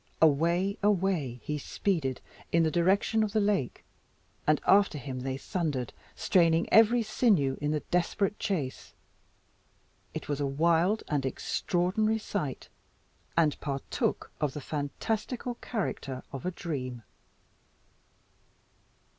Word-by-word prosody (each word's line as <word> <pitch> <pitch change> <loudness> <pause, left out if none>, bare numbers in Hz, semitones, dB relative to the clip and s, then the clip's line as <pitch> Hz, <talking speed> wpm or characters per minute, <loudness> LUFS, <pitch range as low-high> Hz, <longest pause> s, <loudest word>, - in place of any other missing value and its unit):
away! 170 - +2
he 150 0 -3
speeded 145 -5 -1 0.3
in 170 0 +4
the 160 - +2
direction 195 +6 +2
of 215 -1 0
the 220 - +3
lake; 200 - 0 0.6
and 155 -1 +4
after 200 -5 +5
him 130 -2 -5
they 130 +1 -3
thundered, 145 - -2 0.2
straining 165 -2 +3
every 225 +2 +6
sinew 195 - +2
in 145 - 0
the 150 -1 0
desperate 185 +3 +1
chase. 165 -12 -3 1.2
It - - -5
was 145 -1 -2
a 140 - +1
wild 170 +8 +2
and 145 -3 0
extraordinary 185 - 0
sight, 185 - -4 0.7
and 155 -4 +3
partook 140 -1 -2
of 145 -3 0
the - - -5
fantastical 215 - -3
character 140 - -3
of 135 +6 -4
a - - 0
dream. 130 -9 -5
165 Hz, 115 wpm, -29 LUFS, 140-200 Hz, 1.2 s, every